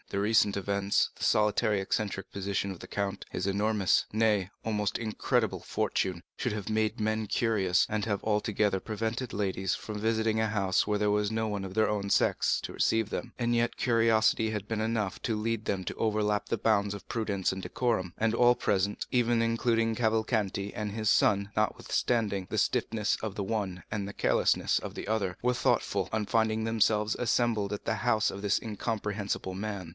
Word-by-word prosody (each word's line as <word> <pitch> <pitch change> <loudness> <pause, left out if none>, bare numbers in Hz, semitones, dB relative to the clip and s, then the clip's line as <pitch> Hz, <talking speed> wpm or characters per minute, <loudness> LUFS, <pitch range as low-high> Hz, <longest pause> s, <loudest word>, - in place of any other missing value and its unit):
The 100 - -2
recent 105 -1 +3
events, 100 +1 +1
the - - -8
solitary 105 0 +2
and 95 - -1
eccentric 100 -3 -2
position 100 0 -2
of 90 - -8
the - - -10
count, 100 -1 -3
his - - -3
enormous, 100 0 +2
nay, 105 -4 +2 0.2
almost 105 -2 0
incredible 110 -2 -1
fortune, 90 -2 -1
should - - -2
have 105 -2 -4
made 110 0 0
men 110 0 0
cautious, 100 -6 +2
and 105 -1 -2
have 100 -3 -1
altogether 105 -2 +1
prevented 115 +3 -3
ladies 95 -2 -1
visiting 110 +1 -1
a 110 - +2
house 95 -3 +1
where 105 - 0
there 105 0 +1
was 105 0 +1
no 110 0 -1
one 100 -2 -3
of 95 0 -7
their 110 -1 +3
own 100 -1 -2
sex - - +2
to - - -6
receive 110 -2 +1
them; 120 - -4
and 120 0 +1
yet 120 0 0
curiosity 115 -2 +3
had 105 -2 -4
been 110 -1 -2
enough 110 -3 -1
to 115 -3 -1
lead 115 0 -1
them 95 -3 -2
to - - -3
overleap 105 -1 0
the 115 - -1
bounds 105 -3 +2
of 100 - -11
prudence 100 -5 -1
and 95 - -5
decorum. 100 -6 -1
And 110 0 +1
all 120 +1 +5
present, 100 -3 0
even 120 -2 +2
including 115 0 +1
Cavalcanti 110 -3 0
and 105 -1 -3
his 110 0 -1
son, 100 -1 +3
notwithstanding 105 -2 0
the - - -3
stiffness 105 -2 +1
of 110 -3 -4
the 100 - -2
one 95 -4 -3
and 100 -2 -2
the 100 - -7
carelessness - - +2
of - - -7
the - - -6
other, 100 -4 -1
were 125 0 +3
thoughtful, - - 0
on 110 -1 -1
finding 110 0 +1
themselves 110 -1 +2
assembled 115 -4 +1
at 105 - -5
the 115 - 0
house 110 -2 +2
of 100 - -7
this 100 -1 +2
incomprehensible 105 -3 -3
man. 100 -3 -5
105 Hz, 185 wpm, -29 LUFS, 100-110 Hz, 0.2 s, all